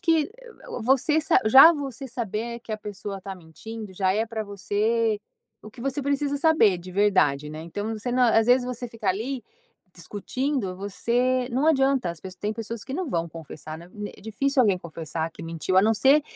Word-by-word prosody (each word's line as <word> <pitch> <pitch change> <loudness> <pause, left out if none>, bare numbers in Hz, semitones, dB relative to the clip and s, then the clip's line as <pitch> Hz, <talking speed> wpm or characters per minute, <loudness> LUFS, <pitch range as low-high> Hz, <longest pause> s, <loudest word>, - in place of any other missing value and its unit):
que 325 -1 +2 0.5
você 270 +6 +3
sa 315 - +4
já 270 +9 +9
você 275 -3 -5
saber 235 0 -4
que 230 - -7
a - - -1
pessoa 200 -1 -6
tá 195 0 -6
mentindo, 195 +5 -9
já 190 0 +1
é 220 +3 +1
pra 225 -1 -4
você, 210 +2 0 0.4
o 215 - -10
que 235 - -14
você 275 +2 -1
precisa 280 +1 0
saber 275 - +4
de 180 +1 -10
verdade 180 -8 +2
né, 155 +1 -7
então 205 +6 -4
você 215 +3 -4
na 245 -2 +3
às 225 - +2
vezes 250 +1 +4
você 250 0 -5
ficar 220 -4 -1
ali 240 +7 -3 0.5
discutindo, 210 - -3
você 245 +6 0
não 260 +5 +1
adianta 270 - +2
as 170 - -8 0.2
tem 205 +3 -3
pessoas 225 0 -6
que 265 - -8
não 360 +4 -2
vão 170 -7 -1
confessar 155 -1 -9
né, 170 +1 -13 0.3
é - - -16
difícil 265 +6 0
alguém 200 -4 +3
confessar 165 -1 -5
que - - -11
mentiu, 165 +3 -2
a 190 - +7
não 220 +2 +3
ser 275 +7 +5
220 Hz, 190 wpm, -25 LUFS, 190-260 Hz, 0.5 s, já